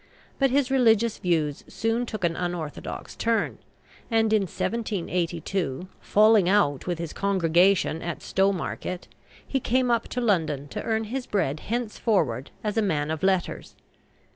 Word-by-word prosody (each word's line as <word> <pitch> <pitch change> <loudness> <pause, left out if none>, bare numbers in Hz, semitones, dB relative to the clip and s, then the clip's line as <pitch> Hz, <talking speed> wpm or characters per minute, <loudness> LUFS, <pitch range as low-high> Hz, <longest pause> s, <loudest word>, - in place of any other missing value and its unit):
But 270 -1 +4
his 270 0 +1
religious 230 -4 +3
views 155 -5 0
soon 225 +2 -1
took 215 -4 -5
an 170 -1 +1
unorthodox 175 -4 -5
turn, 230 -1 0 0.5
and 225 -2 +2
in 215 - +4
1782, 180 - -2
falling 210 -3 +4
out 185 -9 +2
with 175 -2 -1
his 170 -2 -5
congregation 185 -3 +2
at 170 -2 -5
Stowmarket, 190 -1 -1 0.4
he 270 - -1
came 255 0 +1
up 235 -1 +1
to 250 - -3
London 160 - 0
to - - -4
earn 220 0 0
his 250 +4 -4
bread 155 -8 0
henceforward 205 - -1
as 210 0 -2
a - - +4
man 155 -7 0
of 160 - -3
letters. 190 -2 0
195 Hz, 140 wpm, -26 LUFS, 170-225 Hz, 0.5 s, But